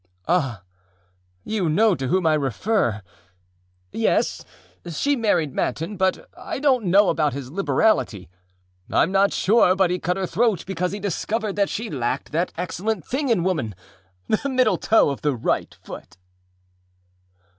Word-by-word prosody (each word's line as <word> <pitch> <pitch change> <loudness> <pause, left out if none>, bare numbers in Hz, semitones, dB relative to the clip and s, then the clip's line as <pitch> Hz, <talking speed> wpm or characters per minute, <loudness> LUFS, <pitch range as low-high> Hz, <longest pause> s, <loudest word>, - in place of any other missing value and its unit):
â 175 +2 +4
âAh, 120 - -6 0.8
you 200 -6 -1
know 210 +6 +4
to 135 -6 -3
whom 185 +5 +1
I 160 - +4
refer. 135 - 0 0.9
Yes, - - 0 0.5
she 280 - 0
married 175 - +1
Manton, 165 +10 -2
but 190 -1 0
I - - -6
donât 270 -3 +3
know 195 +2 +5
about 150 -3 +1
his 135 -1 -7
liberality; 195 - +1 0.6
Iâm 165 - +2
not 195 +1 +3
sure 195 -3 +3
but 190 -2 +2
he 180 - -1
cut 180 +2 -1
her 190 - -1
throat 210 +2 +1
because 180 -1 -2
he 205 - -5
discovered 205 +2 -2
that 200 -1 +2
she 225 -2 -4
lacked 130 -1 -3
that 170 +4 0
excellent 180 +3 -3
thing 270 +1 -2
in 210 -8 +2
woman, 155 - -1 0.5
the 245 +6 0
middle 255 -8 +2
toe 215 -8 +3
of 140 - -6
the 145 -3 0
right 115 - -2
foot. - - -10
185 Hz, 155 wpm, -23 LUFS, 155-215 Hz, 0.9 s, know